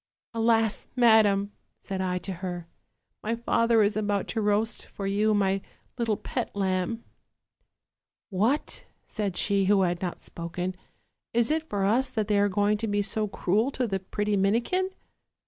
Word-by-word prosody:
" - - -71
'Alas! 225 -1 +2
madam,' 215 -4 +5 0.3
said 190 -1 -4
I 180 -1 0
to 190 - -3
her, 175 -2 -4 0.6
'my 225 +2 -1
father 230 -1 +3
is 205 +1 +1
about 205 -2 0
to 225 - -1
roast 210 +2 0
for 200 - -6
you 210 +2 +2
my 195 -1 +1 0.3
little 230 -4 0
pet - - -4
lamb.' 190 +3 -1 0.6
" - - -59 0.5
'What,' 220 +10 0 0.2
said 200 -5 -3
she 200 -1 +2
who 195 0 +4
had 175 -1 0
not 180 -2 -4
spoken, 175 +2 -4 0.6
'is 235 +3 +3
it 315 0 -1
for 200 -1 0
us 245 +6 +2
that 215 -2 -2
they 205 -1 +3
are 205 0 +3
going 205 +1 +1
to 225 - -2
be 205 -1 +1
so 215 +1 0
cruel 205 +5 +1
to 255 - 0
the 195 -4 -1
pretty 205 +2 -1
Minikin?' 235 - +1
205 Hz, 165 wpm, -27 LUFS, 195-225 Hz, 0.6 s, madam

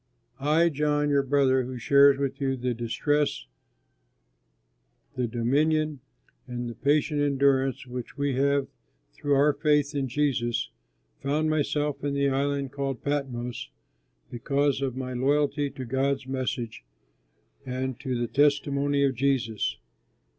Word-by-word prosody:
I, 155 +5 +3
John, 145 -1 0
your 140 -1 +4
brother 135 -1 +2
who 125 0 -5
shares 140 +3 +5
with 140 0 -3
you 135 -1 0
the 125 0 -1
distress, 140 - -1 1.7
the 125 -1 -1
dominion, 150 +6 +1 0.5
and 120 -1 -4
the 120 - -5
patient 145 +3 +1
endurance 135 -1 +2
which 125 +1 -7
we 140 -1 0
have 140 +1 +2 0.5
through 145 - 0
our 145 +2 +4
faith 150 -1 +1
in 140 -2 -1
Jesus, 120 -4 -1 0.5
found 155 +3 0
myself 150 -1 -1
in 140 -1 -1
the 140 0 +2
island 140 0 -1
called 135 -3 -4
Patmos 125 -5 -3 0.6
because 140 +3 0
of 130 -2 -2
my 130 -1 -4
loyalty 145 +3 +1
to 130 -1 -7
God's 135 +2 0
message 130 - -4 0.8
and 130 0 -4
to 130 -4 -3
the 120 - 0
testimony 140 0 +2
of 135 -1 +2
Jesus. 125 -4 0
140 Hz, 130 wpm, -27 LUFS, 130-145 Hz, 1.7 s, shares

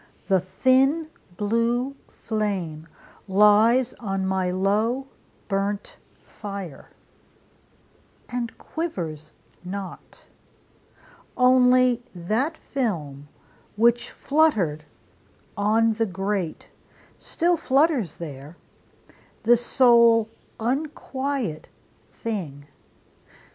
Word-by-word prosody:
the 190 -2 +3
thin 265 - +2 0.3
blue 230 +5 0
flame 190 -8 -3 0.4
Lies 210 +5 +4
on 195 -4 -2
my 190 -1 0
low 210 +8 0 0.4
burnt 200 0 -2 0.3
fire, 200 -7 -8 1.4
and 245 -2 -4
quivers 165 - -5 0.3
not; 190 +1 -8 1.1
Only 250 -1 +5
that 225 - -1
film, 155 - -4 0.5
which 235 +2 +2
fluttered 210 - +1 0.7
on 220 +3 +2
the 225 +1 0
grate, 195 -2 -3 0.5
Still 345 +1 +1
flutters 275 - +1
there, 150 0 -9 0.9
the 235 +2 +6
sole 235 -2 +4 0.3
unquiet 265 - -3 0.4
thing. 165 -11 -5
220 Hz, 70 wpm, -24 LUFS, 190-255 Hz, 1.4 s, the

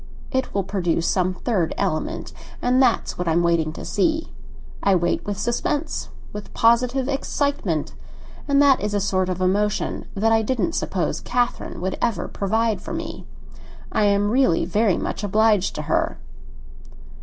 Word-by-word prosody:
It 260 -1 -1
will 195 - 0
produce 175 -4 0
some 185 -1 +1
third 185 -5 -1
element, 155 - -2 0.3
and 250 +2 +3
that's 245 -7 +1
what 180 - -2
I 165 - +3
am 170 +1 +3
waiting 170 -2 +2
to - - -8
see. 315 +10 0 0.5
I 200 -1 +3
wait 175 -1 +1
with 205 -1 -2
suspense—with 240 -2 -3
positive 250 +3 +3
excitement; 275 - -1 0.5
and 280 -1 +3
that 275 -2 +5
is 210 0 -1
a - - +2
sort 185 -2 0
of 185 0 -3
emotion 205 +3 0
that 220 +3 +2
I 225 0 +4
didn't 255 +8 -1
suppose - - -1
Catherine 245 -6 -1
would 185 +1 -2
ever 225 -7 0
provide 220 +2 0
for - - -6
me. - - -6 0.6
I 215 - +2
am 205 0 +2
really 255 -9 +3
very 200 +2 +2
much - - -3
obliged 210 -1 +2
to 150 - -3
her." - - 0
205 Hz, 155 wpm, -23 LUFS, 185-240 Hz, 0.6 s, that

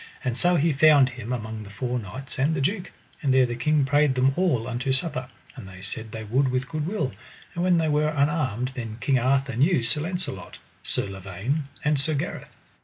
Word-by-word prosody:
And 125 -2 -1
so 175 +7 +3
he 160 0 +3
found 140 -2 +6
him 120 -2 -7
among 110 -3 -4
the 105 - -9
four 125 +4 -2
kings 130 +6 -8
and 150 +4 +2
the - - -1
duke; 180 +7 -1 0.3
and 140 -5 +1
there 130 0 +5
the 120 - -3
king 150 +3 +2
prayed 145 -1 +3
them 130 +1 +3
all 150 -11 +1
unto 125 +2 -1
supper, 130 -2 -1 0.3
and 95 - -9
they 95 0 -11
said 110 +1 -4
they 110 0 -6
would 130 +6 +1
with 130 +1 -1
good 155 +1 -3
will. 160 -9 -1 0.4
And 175 - -2
when 180 -1 +4
they 160 -1 +2
were 150 0 +2
unarmed 140 -5 0
then 115 -4 -6
King 135 +1 +2
Arthur 135 +1 +1
knew 140 +1 +3
Sir 120 +6 +1
Launcelot, 175 - -5 0.2
Sir - - 0
Lavaine, 100 - -3 0.2
and 150 -2 +2
Sir 155 +2 +2
Gareth. 140 - -4
135 Hz, 210 wpm, -25 LUFS, 120-150 Hz, 0.4 s, found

